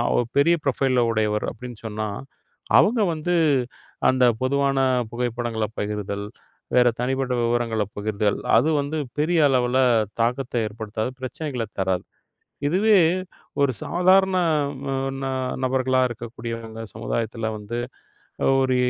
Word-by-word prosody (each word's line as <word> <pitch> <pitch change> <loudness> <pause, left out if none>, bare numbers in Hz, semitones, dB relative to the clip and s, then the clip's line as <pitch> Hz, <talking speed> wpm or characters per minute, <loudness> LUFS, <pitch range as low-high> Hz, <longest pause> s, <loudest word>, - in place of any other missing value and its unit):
ஒரு 120 - +2
பெரிய 165 +5 +5
ப்ரொஃபைல்ல 135 -1 +1
உடையவர் 105 -1 0
அப்படின்னு 125 -2 -9
சொன்னா 110 0 -3 0.7
அவங்க 225 +2 +4
வந்து 160 +3 -2 0.8
அந்தப் 125 -3 +3
பொதுவான 140 0 +1 0.3
புகைப்படங்களப் 120 -2 -2
பகிர்தல், 105 -1 -3 0.5
வேற 125 -1 +6
தனிப்பட்ட 130 +1 -1
விவரங்களப் 115 -3 0
பகிர்தல் 105 0 0 0.2
அது 135 +7 +3
வந்து 145 +3 -3 0.2
பெரிய 165 +3 +2
அளவுல 125 -1 +2 0.4
தாக்கத்த 125 +3 -1
ஏற்படுத்தாது, 110 +2 -4
பிரச்சனைகளத் 130 -4 -5
தராது. 95 -1 0 0.6
இதுவே 200 +7 +4 0.6
ஒரு 140 -2 +3
சாதாரண 185 +1 +3 0.5
ந - - -4 0.3
ந - - -2 0.4
நபர்களா 130 0 +2
இருக்கக்கூடியவங்க, 115 -1 -7
சமுதாயத்துல 110 0 -2
வந்து 105 +3 -5 0.8
ஒரு 130 -1 +2
120 Hz, 110 wpm, -23 LUFS, 110-135 Hz, 0.8 s, வேற